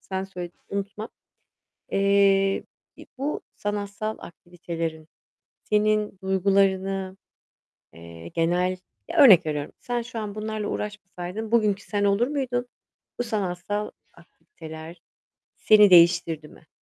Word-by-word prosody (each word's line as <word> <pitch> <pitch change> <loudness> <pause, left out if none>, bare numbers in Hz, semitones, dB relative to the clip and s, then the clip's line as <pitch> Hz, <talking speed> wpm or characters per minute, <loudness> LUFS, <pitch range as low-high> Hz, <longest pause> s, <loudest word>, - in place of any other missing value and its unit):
sen 190 0 -4
söyle 180 -3 -7 0.2
unutma. 200 +2 -4 0.8
Eee, 195 0 +3 0.3
bir - - -13
bu 285 +3 -2
sanatsal 205 +1 -4
aktivitelerin 165 -2 -6 0.6
senin 210 -1 +1
duygularını, 190 0 +1 0.8
eee, 85 0 -11
genel, 180 - 0 0.3
ya, 335 +1 -3
örnek 215 - +8
veriyorum, 150 -1 -3
sen 245 -1 -3
şu 235 0 -7
an 210 -2 -5
bunlarla 215 -1 -4
uğraşmasaydın 210 +1 -5
bugünkü 210 -4 +2
sen 205 -1 -1
olur 200 +4 +3
muydun? 255 -4 -2 0.5
Bu - - +1
sanatsal 205 -1 -3 0.2
aktiviteler 160 - -12 0.6
seni 210 -2 +6
değiştirdi 170 -3 +5
mi? 160 - -19
195 Hz, 105 wpm, -25 LUFS, 175-215 Hz, 0.8 s, örnek